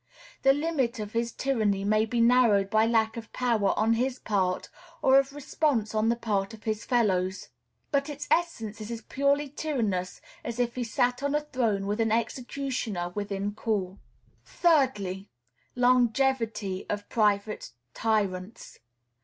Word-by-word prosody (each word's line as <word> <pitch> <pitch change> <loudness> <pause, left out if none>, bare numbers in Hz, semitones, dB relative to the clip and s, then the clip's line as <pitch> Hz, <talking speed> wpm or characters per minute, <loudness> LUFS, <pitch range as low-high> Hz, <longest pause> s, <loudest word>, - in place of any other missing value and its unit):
The 270 - +6
limit 280 -5 0
of 210 -1 -6
his 230 0 0
tyranny 215 -8 0
may 215 +2 +2
be 235 +1 0
narrowed 230 -5 +4
by 220 0 +4
lack 225 -1 +1
of 225 -1 -8
power 230 -6 +1
on 220 +1 +3
his 250 +3 0
part, 190 -5 -1 0.4
or 265 +1 +7
of 275 0 -1
response 285 -6 -1
on 215 +1 +2
the 235 - +2
part 210 -2 -2
of 215 - -19
his 215 -1 -2
fellows; 190 -6 0 0.4
but 280 0 +1
its 295 0 -6
essence 225 -11 0
is 215 - -6
as 230 -1 -5
purely 280 +2 +1
tyrannous 230 -11 -2 0.2
as 235 0 -5
if 240 -1 0
he 250 - -3
sat 245 +2 0
on 285 +1 0
a 300 - +2
throne 235 -9 -1
with 205 +3 -1
an 225 -1 +1
executioner 235 -5 -2
within 200 +1 -3
call. 200 -3 -2 0.4
Thirdly. 210 - +1 0.5
Longevity 245 -5 +1
of 205 0 -3
private 210 - 0 0.2
tyrants. 205 -2 -2
225 Hz, 150 wpm, -27 LUFS, 205-260 Hz, 0.5 s, or